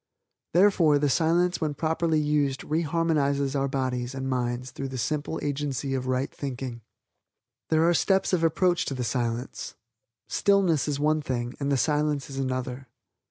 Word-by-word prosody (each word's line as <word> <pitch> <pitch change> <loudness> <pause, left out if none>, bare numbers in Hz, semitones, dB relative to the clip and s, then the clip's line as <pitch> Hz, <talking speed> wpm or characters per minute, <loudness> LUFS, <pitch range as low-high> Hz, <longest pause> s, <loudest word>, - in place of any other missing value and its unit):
Therefore 175 -5 +5
the 145 -1 +1
Silence 175 +4 +2
when 150 -2 -1
properly 160 +1 +1
used 145 -3 0
re 155 +2 0
harmonizes 145 -4 +1
our 140 0 +1
bodies 130 -1 -2
and 135 0 -3
minds 125 -1 -2
through 135 - -5
the 130 0 -6
simple 150 +5 -2
agency 140 -1 -2
of 130 -1 -2
right 130 +1 -1
thinking. 130 -3 -5 0.9
"There 160 +1 +3
are 175 - +4
steps 190 +3 +2
of 170 -2 +2
approach 175 +2 +2
to 135 - -3
the 125 - -2
Silence. 120 +1 -3 0.5
Stillness 190 -8 +2
is 145 -1 -1
one 155 +1 +2
thing 120 -3 -3
and 140 0 -1
the 140 - +3
Silence 150 -1 0
is 135 - -5
another. 130 0 -3
140 Hz, 160 wpm, -26 LUFS, 130-160 Hz, 0.9 s, Therefore